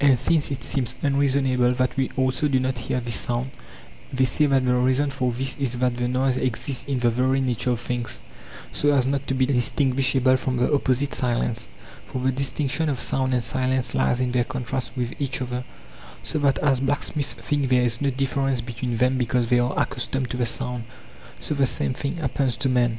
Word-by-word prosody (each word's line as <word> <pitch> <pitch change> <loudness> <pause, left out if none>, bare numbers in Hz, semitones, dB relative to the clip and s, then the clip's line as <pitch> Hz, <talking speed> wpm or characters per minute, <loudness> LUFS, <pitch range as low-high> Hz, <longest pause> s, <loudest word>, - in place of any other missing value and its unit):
And 135 -3 +6
since 155 +5 +1
it 135 -4 -4
seems 125 -1 -1
unreasonable 135 -3 +2
that 130 0 0
we 135 -1 0
also 130 +3 +1
do 135 -2 +2
not 130 -1 -1
hear 125 +2 -2
this 120 -1 0
sound, 120 +2 -2 0.6
they 130 0 +2
say 150 +4 +2
that 135 -2 +2
the 125 - +3
reason 130 +3 +2
for 130 -2 -1
this 130 +3 -1
is 130 -4 -1
that 125 0 +1
the 120 0 -1
noise 130 +1 +1
exists 130 +1 -1
in 140 -2 -1
the 120 -1 +2
very 130 +3 +1
nature 125 -2 0
of 120 -2 0
things, 120 -1 -2 0.5
so 145 - +2
as 135 -3 +3
not 135 +1 -1
to 135 - 0
be 130 0 +2
distinguishable 130 0 +2
from 130 -1 -2
the 125 - +1
opposite 140 0 +1
silence; 120 - -1 0.4
for - - -5
the 130 +1 +1
dis 135 +1 -1
tinction 150 +3 0
of 135 -3 -1
sound 130 +1 +1
and 120 - +1
silence 130 +1 0
lies 125 - +1
in 125 -1 0
their 125 -1 +2
contrast 130 0 -4
with 120 -1 -2
each 135 -2 -1
other, 125 0 -3 0.6
so 155 - -1
that 140 -2 +2
as 135 -3 +2
blacksmiths 145 +1 -1
think 145 -3 -1
there 125 -1 +4
is 120 +1 0
no 140 - +2
difference 135 0 0
between 120 0 -4
them 130 +2 +2
because 120 -1 0
they 125 - +5
are 120 +2 0
accustomed 125 0 -1
to - - -3
the 125 -1 +1
sound, 125 0 -1 0.6
so - - 0
the 140 -2 +2
same 130 - 0
thing 140 +5 -4
happens 135 -4 -1
to 135 - -1
men. 125 -1 +3
130 Hz, 210 wpm, -24 LUFS, 125-135 Hz, 0.6 s, And